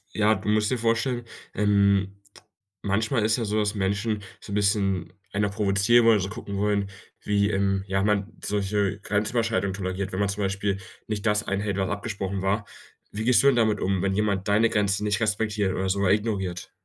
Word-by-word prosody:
Ja, 110 +1 +3
du - - -7
musst 105 0 +2
dir 130 - 0
vorstellen, 115 +1 0 0.3
ähm, 100 -1 +2 0.7
manchmal 110 +3 +1
ist 110 0 +2
ja 115 - -1
so, 105 +1 -1
dass 105 -1 +1
Menschen 105 +2 -1 0.2
so - - -11
'n - - -1
bisschen 100 -4 +1 0.2
einer 100 +1 0
provozieren 100 +4 +3
wollen, 115 -2 +6
so 95 0 -3
gucken 100 -1 -6
wollen, 100 0 +1 0.4
wie, 100 0 +2
ähm, 95 -1 0
ja, 95 0 0
man 105 0 0
solche 100 -1 0
Grenzüberschreitungen 105 -1 0
toleriert, 95 0 -3
wenn 95 - -2
man 100 -1 +1
zum 100 +1 -2
Beispiel 100 0 -1 0.3
nicht 105 -2 -3
das 105 -1 +2
einhält, 100 0 -1
was 95 -1 0
abgesprochen 100 -2 -3
war. 100 +2 0 0.5
Wie 105 +2 -4
gehst 125 +1 +5
du 140 - +4
denn 140 - +5
damit 110 -3 +2
um, 95 -1 0
wenn 100 -1 +1
jemand 100 -2 0
deine 110 +3 +3
Grenzen 100 -1 +1
nicht 105 -1 +1
respektiert 105 -2 0
oder 95 0 -1
sogar 100 -1 +2
ignoriert? 100 -4 -1
100 Hz, 190 wpm, -25 LUFS, 100-105 Hz, 0.7 s, wollen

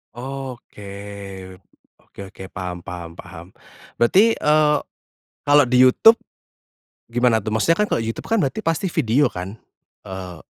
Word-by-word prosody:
Oke, 130 -5 -8 1.1
oke - - -21
oke 95 - -11
paham 90 -1 -5
paham 85 -2 -8
paham, 85 -1 -11 0.5
berarti, 195 - +5
eee, 150 0 +3 0.7
kalau 145 -1 +5
di 125 +1 +4
YouTube, 175 - +7 0.9
gimana 120 -1 +2
tuh, 110 0 -5
maksudnya 165 +10 +2
kan 210 - +2
kalau 115 - 0
YouTube 115 0 -5
kan 225 -1 +1
berarti 140 +10 -1
pasti 165 +4 0
video 140 -3 +2
kan, 90 +3 -6 0.5
eee, 95 -2 -8
120 Hz, 130 wpm, -21 LUFS, 100-150 Hz, 1.1 s, YouTube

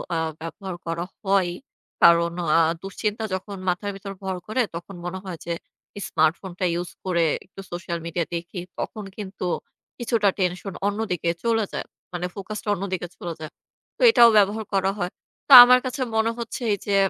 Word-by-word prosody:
আ - - +1 0.2
ব্যবহার 185 +3 -6
করা 165 +1 -2 0.2
হয়ই। 190 -3 +2 0.5
কারণ 170 0 +6 0.3
আ 165 - +6 0.2
দুশ্চিন্তা 210 +3 -3
যখন 195 +1 -4
মাথার 185 +3 0
ভেতর 195 0 -7
ভর 190 -1 -3
করে 250 +4 +1
তখন 175 +3 -7
মনে 180 +2 -4
হয় 180 -3 -5
যে 170 - -1 0.6
স্মার্টফোনটা 175 +4 0
ইউজ 175 +1 -3 0.2
করে 170 -3 +2 0.2
একটু 195 - -11
সোশ্যাল 175 -1 -4
মিডিয়া 170 0 -1
দেখি। 175 +2 -5 0.2
তখন 215 - -4
কিন্তু 195 -3 -6 0.5
কিছুটা 230 -4 +2
টেনশন 180 +1 -1
অন্যদিকে 205 -5 -1
চলে 225 -2 +2
যায়। - - -4 0.3
মানে 175 0 -2
ফোকাসটা 210 +2 -6
অন্যদিকে 185 -2 -3
চলে 170 -1 -5
যায়। 155 -1 -7 0.5
তো - - -12
এটাও 235 - +8
ব্যবহার 210 +2 +3
করা 195 0 +2
হয়। 175 0 -2 0.4
তো - - -6
আমার 250 +1 +6
কাছে 255 +2 -3
মনে 220 +1 +2
হচ্ছে 235 +2 -5
এই - - -1
যে 200 - +2
190 Hz, 165 wpm, -24 LUFS, 175-210 Hz, 0.6 s, এটাও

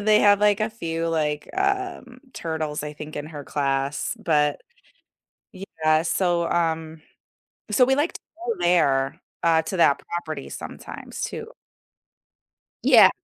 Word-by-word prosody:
and 205 - -6
they 215 0 +6
have 205 -1 +5
like 210 0 +4
a 215 - +1
few, 165 -6 -3
like, 150 -2 -1
um, 385 -10 -2
turtles, 155 -2 -3
I 150 0 -5
think, 150 +1 -9
in 145 +1 -4
her 145 -3 -8
class, 140 +5 -1
but 150 -8 +1 0.9
yeah. 160 -5 0
So, 175 0 +1
um 160 -2 -1 0.7
so 250 +4 +5
we 265 +1 +3
like 300 +4 +1
to - - -9 0.3
go 235 - 0
there, 140 -6 +2 0.2
uh, 165 -1 +4
to 185 - -4
that 145 -4 +4 0.2
property 155 -5 -4
sometimes - - -8
too. - - -5 1.3
Yeah. - - +8
165 Hz, 140 wpm, -24 LUFS, 150-205 Hz, 1.3 s, Yeah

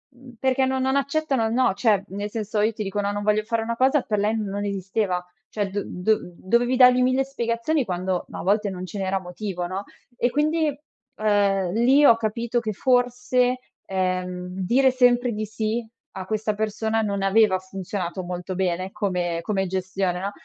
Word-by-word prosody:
mhmm, 250 0 -14
perché 265 0 +2
no 265 0 0
non 265 +1 +1
accettano 280 -3 0
no, 235 -2 +2
cioè 205 -3 +2
nel 205 +2 -4
senso 215 -1 -3
io 220 +2 +2
ti 215 - -4
dico 205 +1 -3
no, 200 0 -1
non 205 0 -3
voglio 210 0 +2
fare 230 0 -1
una 230 +1 -3
cosa, 265 +2 +3
per 210 -3 -1
lei 210 +2 +1
non 205 -1 -3
esisteva, 190 -2 -2 0.2
cioè 205 -2 -2
do 200 +1 -3
do 210 +5 0 0.2
dovevi 240 +7 +1
dargli 250 0 +6
1.000 255 +1 +3
spiegazioni 250 +2 -1
quando 180 -1 -2
ma - - -8
a - - -3
volte 205 +2 +2
non 185 -1 -6
ce 185 - -8
n'era 190 0 0
motivo, 180 0 -5
no. 190 +2 -4 0.3
E 245 - +2
quindi, 310 +2 +1 0.5
ehm, 200 -3 +2
lì 255 +6 +4
ho 230 -5 +7
capito 230 +2 -1
che 215 -2 -3
forse, 250 +1 +1 0.3
ehm, 185 -1 -2 0.2
dire 260 +5 +4
sempre 245 -1 +3
di 215 0 -3
sì 220 +2 -2 0.3
a 185 - -5
questa 215 +1 -1
persona 220 +1 -1
non 200 -2 -1
aveva 195 -1 +4
funzionato 185 -1 -5
molto 180 +1 -5
bene 185 0 -1
come 175 -4 -1
come 195 -2 0
gestione, 185 -1 -2
no. 200 +2 -3
215 Hz, 185 wpm, -24 LUFS, 190-245 Hz, 0.5 s, ho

